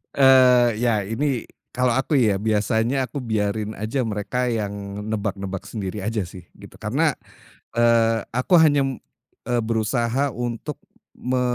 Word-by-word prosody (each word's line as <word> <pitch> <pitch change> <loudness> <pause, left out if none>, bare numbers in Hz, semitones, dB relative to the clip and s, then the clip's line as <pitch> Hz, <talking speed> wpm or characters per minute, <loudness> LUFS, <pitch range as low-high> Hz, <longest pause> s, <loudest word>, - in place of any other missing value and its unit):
eee, 130 -3 +6
ya 115 -4 +1
ini 120 +5 -1 0.3
kalau 125 -1 +2
aku 135 +4 +1
ya, 105 -6 +2
biasanya 110 +4 +1
aku 135 +3 -6
biarin 110 -2 -2
aja 110 +6 -2
mereka 115 +3 -2
yang 105 -4 -2 0.4
nebak-nebak 100 -2 -3
sendiri 105 -2 -5
aja 105 0 -2
sih, 90 +1 -11 0.2
gitu. - - -13
Karena, - - +1 0.6
eee, 115 -1 +3
aku 130 +9 +3
hanya 145 -3 +4
m 135 -1 -4 0.5
eee, 120 - +1
berusaha 115 +4 0
untuk 120 -2 -5 0.4
me 125 0 -1
115 Hz, 135 wpm, -23 LUFS, 105-125 Hz, 0.6 s, eee